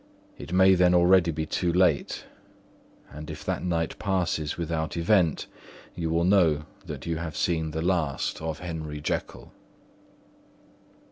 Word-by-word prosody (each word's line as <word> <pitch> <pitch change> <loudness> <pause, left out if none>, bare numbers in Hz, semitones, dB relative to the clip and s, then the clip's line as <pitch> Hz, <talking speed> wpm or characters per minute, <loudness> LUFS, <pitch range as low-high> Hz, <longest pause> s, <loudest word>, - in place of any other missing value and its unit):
It - - -10
may 95 +1 +6
then 90 -1 +4
already 90 0 +5
be 80 -1 -2
too 85 +2 -1
late; 90 -5 +1 0.9
and 75 +2 -9
if 75 -1 -8
that - - -2
night 85 -2 -2
passes 90 -6 -1
without 80 -1 -3
event, 85 -2 +2 0.5
you 85 -2 -3
will 85 +1 +1
know 85 -6 +3 0.2
that - - -7
you 85 -1 -2
have 80 -1 -5
seen 80 -2 0
the 80 +1 -3
last 85 -7 -1
of 80 -1 -3
Henry 80 -4 -6
Jekyll." 75 - -4
85 Hz, 140 wpm, -26 LUFS, 80-90 Hz, 0.9 s, may